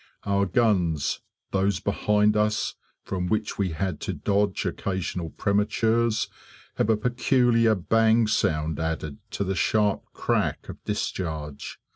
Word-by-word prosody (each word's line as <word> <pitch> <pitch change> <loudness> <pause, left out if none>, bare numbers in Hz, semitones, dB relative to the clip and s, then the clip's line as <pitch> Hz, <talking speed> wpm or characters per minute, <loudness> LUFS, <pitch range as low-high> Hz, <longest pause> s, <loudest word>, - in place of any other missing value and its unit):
Our 100 0 +1
guns 90 - +1 0.3
those 95 -1 +1
behind 105 +1 +2
us, 105 0 +1 0.3
from 90 -2 -3
which 110 +1 -1
we 100 -2 +1
had 90 0 -2
to - - -3
dodge 100 -1 0
occasional 90 -3 -3
prematures 110 +4 +1 0.5
have - - +1
a 110 - +4
peculiar 120 -1 +3
bang 115 +4 +3
sound 80 -7 0
added 80 -2 -3
to - - -2
the 95 0 -1
sharp 105 +1 +1
crack - - -1
of - - -9
discharge. 75 -5 -4
100 Hz, 125 wpm, -26 LUFS, 90-110 Hz, 0.5 s, a